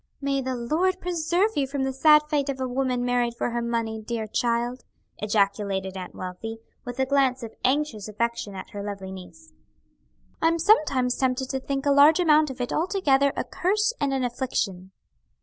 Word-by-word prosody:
"May 275 -1 0
the 260 0 -3
Lord 335 +10 0
preserve 350 +4 0
you 275 -2 +1
from 275 0 -2
the 265 0 -1
sad 300 +3 +6
fate 290 -2 0
of 270 -1 -3
a 260 - -1
woman 250 -1 -1
married 245 -1 0
for 240 - -2
her 235 0 -1
money, 230 -2 -2
dear 225 0 -3
child!" 240 +3 -1 0.4
ejaculated 200 -2 0
Aunt 185 -1 -7
Wealthy, 185 +5 -6 0.3
with 245 +1 -7
a 265 - +3
glance 265 -2 +2
of 225 - -7
anxious 260 -6 0
affection 215 -1 -3
at 190 - -8
her 205 - -6
lovely 200 -2 -6
niece. 255 - -12 0.9
"I'm 330 +1 +3
sometimes 300 - +3
tempted 260 0 0
to 265 - -1
think 275 +1 -3
a 285 - +3
large 290 +4 +6
amount 310 -3 +4
of 265 0 -8
it 245 - -2
altogether 300 -6 +2
a - - 0
curse 420 +5 0
and 280 -2 0
an 265 -1 0
affliction." 225 -7 -2
260 Hz, 185 wpm, -25 LUFS, 230-295 Hz, 0.9 s, sad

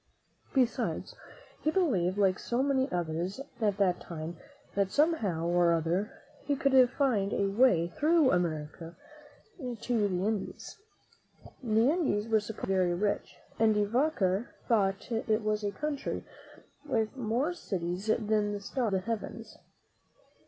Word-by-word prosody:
Be 260 -2 +6
sides, 235 - -4 0.5
he 310 - +1
believed, 210 - +1
like 190 -2 +3
so 245 +2 0
many 270 -1 +1
others 175 +3 -2 0.2
at 205 -2 +1
that 185 -3 +2
time, 165 0 -6 0.4
that 200 -1 +1
somehow 215 - +1
or 175 0 +3
other 170 +6 -1 0.2
he 285 - 0
could 265 -2 +5
find 240 -8 +1
a 200 - +1
way 195 -5 +3
through 305 - +3
America 165 -1 -2 0.6
to 240 -4 -1
the 185 0 -1
Indies. 220 - -4 0.8
The 230 +2 +3
Indies 275 - 0
were 220 -1 +3
supposed 210 +1 -8
to - - -3
be - - +2
very 180 -2 +2
rich, 200 +3 -1 0.2
and 220 -1 +4
De 210 0 +2
Vaca 220 -4 +1 0.2
thought 200 -3 +1
it 220 -1 0
was 215 0 0
a 205 - 0
country 290 +6 -3 0.6
with 225 -5 -1
more 255 +7 0
cities 185 - -4
than 215 -1 +1
the 205 - -3
stars 235 +5 -2
of 205 - -1
the 190 - +2
heavens. 225 -2 -5
210 Hz, 145 wpm, -30 LUFS, 185-250 Hz, 0.8 s, Be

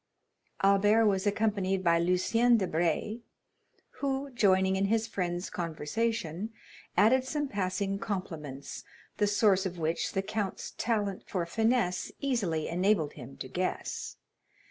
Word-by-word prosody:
Albert 205 +3 +5
was 195 -1 +2
accompanied 200 -3 +1
by 170 -1 +4
Lucien 225 +8 +3
Debray, 175 +3 0 0.8
who, 275 0 -1
joining 190 -5 +3
in 195 +1 +1
his 220 +2 +1
friend's 180 -5 -3
conversation, 180 +4 -2 0.5
added 230 +7 +5
some 290 +2 -2
passing 195 -2 -1
compliments, 155 -10 -5 0.3
the 205 - +2
source 205 -2 +3
of 185 -2 -4
which 165 0 -1
the 195 - 0
count's 205 -1 -3
talent 205 -4 -1
for 180 -3 -1
finesse 220 0 +1
easily 200 - 0
enabled 180 -3 +1
him 130 +3 -10
to - - -6
guess. 180 +7 -3
195 Hz, 120 wpm, -30 LUFS, 175-220 Hz, 0.8 s, Albert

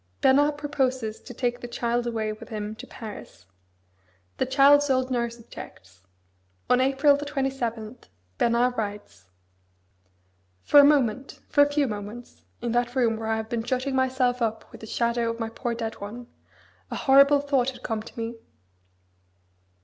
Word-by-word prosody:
Bernard 290 +2 +4
proposes 260 -6 -1
to - - -12
take 245 0 -2
the 240 - -7
child 240 0 -1
away 220 -2 -2
with 215 - -12
him 215 -1 -4
to - - -10
Paris. 210 - -10 0.9
The 260 - 0
child's 285 +2 +5
old 260 0 +1
nurse 235 -1 -2
objects. 95 - -13 0.6
On 250 0 +5
April 275 +2 +4
the 285 - -4
twenty 275 -2 -1
seventh, 230 -2 -5 0.3
Bernard 240 +1 +2
writes: 200 - -6 1.3
For 290 - +6
a - - +9
moment 270 -3 +2
for 290 - +4
a 285 0 +4
few 290 -1 +2
moments 210 +2 -8 0.2
in 240 - -1
that 240 +1 0
room 235 -4 +2
where 220 0 -5
I 220 - +1
have 220 0 -5
been 235 -2 -1
shutting 255 +3 -2
myself 260 -1 +1
up 225 -1 -2
with - - -12
the 220 - -9
shadow 235 +1 0
of 230 0 -4
my 225 -1 -2
poor 235 +1 -4
dead 225 -1 -4
one, 225 +4 -7 0.6
a - - -5
horrible 280 +1 +5
thought 275 -3 +1
had 255 -1 -11
come 225 -2 -2
to 215 - -13
me. 230 0 -5
240 Hz, 165 wpm, -25 LUFS, 225-265 Hz, 1.3 s, a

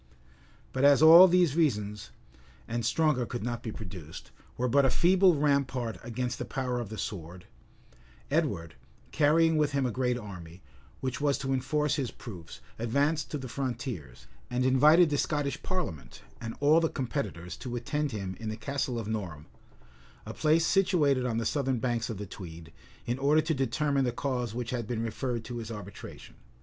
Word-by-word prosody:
[] - - -29
But 130 - -1
as 145 +1 +6
all 170 +4 +10
these 175 -5 +3
reasons 105 -10 0 0.6
(and 120 0 -2
stronger 150 +1 +2
could 120 -1 -5
not 120 0 -3
be 115 - -5
produced) 90 -8 -9 0.3
were 125 - 0
but 140 +3 +4
a 135 - +4
feeble 180 +4 +4
rampart 135 -5 0
against 120 +1 -3
the - - -2
power 125 -3 -2
of 120 -4 -5
the 110 - -7
sword, 90 -3 -6 0.9
Edward, 100 - 0 0.4
carrying 160 +2 +3
with 150 -2 +1
him 140 -2 +1
a 125 - 0
great 125 0 0
army, 90 -5 -10 0.4
which 130 -1 -3
was 145 -1 +2
to 135 -1 -2
enforce 150 +3 0
his 135 -5 -1
proofs, 90 - -10 0.2
advanced 140 +7 0
to 150 - -3
the 130 -2 -7
frontiers, 120 - -5 0.2
and 125 +1 0
invited 150 +6 +6
the 145 - +1
Scottish 145 -2 -1
parliament, 80 - -5 0.2
and 115 -1 -5
all 150 +3 +5
the 165 -1 +1
competitors, 100 - -4
to 125 -1 -6
attend 145 +4 -2
him 100 -4 -4
in 110 -1 -4
the 110 - -4
Castle 135 0 -2
of 115 -3 -4
Norham, 90 -9 -4 0.8
a - - -6
place 160 +1 +2
situated 150 -10 +2
on 115 -2 -1
the 115 - -1
southern 135 0 0
banks 120 0 -1
of 110 - -4
the 105 - -5
Tweed, 85 -4 -10 0.3
in 120 +2 -2
order 145 +3 +4
to 160 +1 -1
determine 140 +1 0
the 125 - 0
cause 125 -3 -3
which 120 -1 -3
had 120 -4 -3
been 115 -1 -2
referred 115 +1 -3
to 120 0 -6
his 115 -1 -6
arbitration. 105 -3 -9
125 Hz, 180 wpm, -29 LUFS, 110-145 Hz, 0.9 s, all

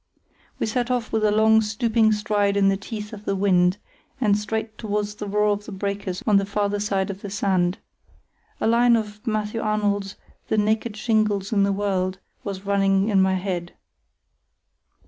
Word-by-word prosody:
We - - -1
set 240 +3 -1
off 245 -3 -1
with 220 -1 +1
a 215 - +4
long, 220 +1 +4
stooping 220 +1 +2
stride 205 -1 +1
in 195 -1 +4
the 195 - +2
teeth 210 +2 -7
of 210 0 -9
the 195 - 0
wind, 185 -1 +3 0.4
and 210 -5 +3
straight 220 +1 -3
towards 210 -1 -2
the 210 0 -7
roar 210 +1 +2
of 205 0 -1
the - - -7
breakers 200 -1 -4
on 210 -3 +4
the 195 - +1
farther 205 0 -1
side 200 -1 -1
of 195 +1 -10
the 200 - -6
sand. 190 -3 0 0.8
A - - -1
line 235 +1 +4
of 210 -2 -3
Matthew 215 +1 -1
Arnold's, 205 -2 -1 0.3
"The 220 - 0
naked 215 +1 0
shingles 215 -2 0
of 200 - +3
the 200 0 +3
world," 190 -2 -1 0.3
was 200 -1 -6
running 195 0 +2
in 195 -3 +4
my 190 0 +3
head. 180 -2 -3
205 Hz, 180 wpm, -23 LUFS, 195-215 Hz, 0.8 s, a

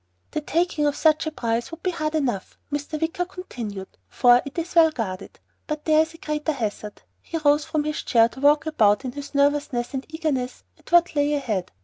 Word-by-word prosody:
"The 305 - -2
taking 320 -1 0
of 290 - 0
such 315 +1 +3
a - - -2
prize 235 -4 -2
would 330 0 -10
be 370 - +1
hard 310 -2 -2
enough," 245 -11 -2
Mr. 290 +1 -3
Wicker 330 +2 -1
continued, 235 - -7 0.2
"for 245 - +5
it 280 - -10
is 335 +1 -3
well 330 -2 +6
guarded. 215 -11 -5 0.3
But 305 -1 -4
there 310 0 +5
is 320 +1 -3
a - - -12
greater 305 0 -2
hazard." 210 -4 -5 0.2
He 330 - -4
rose 295 -1 +3
from 305 -1 -1
his 305 +1 -2
chair 230 -2 +4
to 235 - -12
walk 295 +2 +4
about 220 -7 +3
in 255 - -3
his 285 +2 -9
nervousness 280 -3 +1
and 265 -1 -3
eagerness 305 -6 -2 0.2
at - - -17
what 345 -1 +4
lay 290 0 +2
ahead. 215 -10 -2
295 Hz, 210 wpm, -24 LUFS, 245-315 Hz, 0.3 s, well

